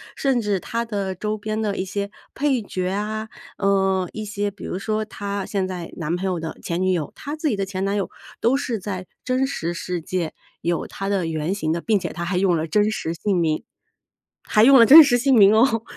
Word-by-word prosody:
甚 270 -4 +1
至 205 -3 0
它 235 +3 -3
的 200 -4 -3
周 210 +3 -3
边 215 +1 -3
的 205 -2 -1
一 185 - -2
些 200 +1 -3 0.2
配 275 -4 +1
角 185 -2 -3
啊， 215 +2 -3 0.3
呃， 195 -2 +2
一 215 - -5
些 205 -1 -2
比 200 - -13
如 185 - -4
说 215 +1 -1
她 200 -2 -5
现 195 -2 -1
在 180 -3 -6
男 165 0 -2
朋 185 +2 -4
友 180 -3 -1
的 160 0 -6
前 170 +2 -2
女 185 0 +2
友， 160 -4 -2
她 290 +2 -6
自 310 -1 -1
己 215 - 0
的 195 - -1
前 190 0 -4
男 200 +1 0
友 195 - -2 0.3
都 240 +4 +3
是 245 -6 -2
在 185 -1 -5 0.2
真 255 +1 +1
实 175 -10 -3
世 175 0 -4
界 170 -1 -3 0.3
有 170 0 -1
它 195 0 -5
的 190 -4 0
原 160 +3 -2
型 160 -6 -2
的， 170 - -2
并 215 -3 +2
且 170 -3 -4
它 170 +2 -4
还 180 +1 -1
用 185 -2 +3
了 160 0 -1
真 210 +4 +2
实 165 -6 -3
姓 195 +3 -1
名， 160 -2 0 0.8
还 215 - +3
用 270 +2 +8
了 230 - +9
真 310 +5 +11
实 245 -4 +3
姓 265 +1 +3
名 205 0 +7
哦， 225 -1 +3
200 Hz, 250 characters per minute, -22 LUFS, 180-220 Hz, 0.8 s, 真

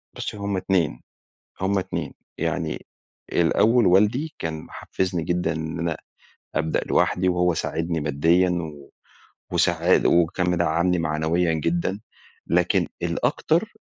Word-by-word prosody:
بُصّي - - -5
هم 100 -1 -2
2 90 -9 0 0.6
هم 100 +1 +1
2 95 - -4 0.2
يعني - - -2 0.5
الأول 110 +7 +3
والدي 105 - +3
كان 80 -1 -3
محفزني 90 -3 -3
جدًا 90 0 0
إن 80 0 -4
أنا 85 -2 -1 0.6
أبدأ 80 0 0
لوحدي، 90 +1 +2
وهو 90 -1 +2
ساعدني 80 +1 -2
ماديًا، 80 +5 +2
و 80 -5 -5 0.6
وساعا 85 +1 +3
وكان 85 +1 +3
مدعمني 85 +1 +1
معنويًا 80 +2 +1
جدًا، 85 +5 -1 0.5
لكن - - +2
الأكتر، - - 0
85 Hz, 110 wpm, -24 LUFS, 80-90 Hz, 0.6 s, الأول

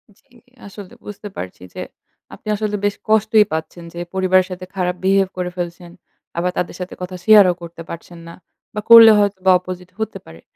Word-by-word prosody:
জী। 250 +4 -29 0.3
আসলে 200 -1 -11
বুঝতে 205 0 -8
পারছি 90 -1 -7
যে - - -7 0.5
আপনি - - -14
আসলে 210 0 -2
বেশ 205 - 0
কষ্টই 215 0 +4
পাচ্ছেন 160 +2 -5
যে 170 - -7
পরিবারের 185 -1 +2
সাথে 185 0 -7
খারাপ 180 -1 -1
বিহেভ 195 0 +3
করে 180 -1 -2
ফেলছেন। 175 0 -6 0.5
আবার 180 +1 0
তাদের 175 - -3
সাথে 180 0 -6
কথা 180 0 -6
শেয়ারও 205 -4 +7
করতে 170 0 -10
পারছেন 170 +1 -10
না। 170 - -10 0.4
বা 210 - -4
করলে 230 -1 +10
হয়তোবা 190 -2 +2
অপোজিট 180 0 -9
হতে 220 -2 -4
পারে। 80 +1 -14
185 Hz, 175 wpm, -19 LUFS, 175-205 Hz, 0.5 s, করলে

